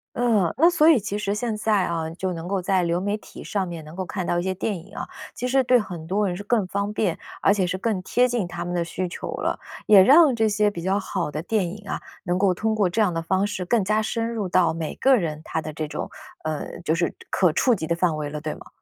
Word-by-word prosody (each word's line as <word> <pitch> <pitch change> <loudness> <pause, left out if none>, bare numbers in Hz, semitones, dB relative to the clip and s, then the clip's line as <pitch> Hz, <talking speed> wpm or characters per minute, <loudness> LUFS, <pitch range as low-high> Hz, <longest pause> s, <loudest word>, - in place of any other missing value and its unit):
嗯， 220 -8 +2
那 330 +5 +6
所 325 -3 +4
以 300 -8 +6
其 205 0 -3
实 200 -1 -1
现 215 +1 -2
在 210 -3 +2
啊， 165 -2 -2
就 185 +2 -3
能 165 0 -6
够 195 0 -1
在 185 0 +1
流 170 +1 0
媒 205 +2 -1
体 - - -12
上 195 -3 -2
面 170 -2 -6
能 155 +2 -11
够 185 0 -3
看 185 -1 -4
到 175 - +1
一 175 - -2
些 190 - -1
电 200 +2 -2
影 195 +5 -14
啊， - - -5 0.3
其 250 - -3
实 265 +1 +3
对 250 0 +4
很 175 -7 -6
多 200 +4 +1
人 175 -1 -2
是 205 - -7
更 210 -3 +1
方 200 +2 -2
便， 190 -6 0 0.2
而 - - +5
且 200 -2 +2
是 180 +1 -2
更 210 -2 0
贴 245 +6 +3
近 235 -7 -1
他 175 - -5
们 175 0 -3
的 170 -1 0
需 180 +2 -3
求 - - -6
了。 - - -2 0.3
也 200 -3 +9
让 285 - +7
这 225 -1 +2
些 210 0 +2
比 175 -5 -7
较 195 +2 +1
好 185 -5 -3
的 150 - -3
电 195 +1 0
影 200 +3 -9
啊， - - -2 0.3
能 175 +1 0
够 195 -1 +3
通 220 +4 -1
过 205 -4 +3
这 220 +6 0
样 205 -4 +3
的 165 -1 -3
方 190 +4 +1
式 190 -3 -4
更 220 +3 +2
加 215 +3 +1
深 230 +1 -1
入 215 -4 -2
到 180 -1 +3
每 160 -1 -4
个 265 0 +4
人 160 -8 -2
他 - - -3
的 155 - -6
这 155 0 -3
种， - - -5 0.3
呃， 155 -1 -4
就 160 -2 0
是 170 0 0 0.2
可 180 -4 +3
触 245 +10 +3
及 160 -7 -2
的 170 - +1
范 170 -2 +1
围 150 -1 -3
了， 150 +1 -5
对 155 0 -4
吗？ - - -13
190 Hz, 295 characters per minute, -24 LUFS, 170-215 Hz, 0.3 s, 也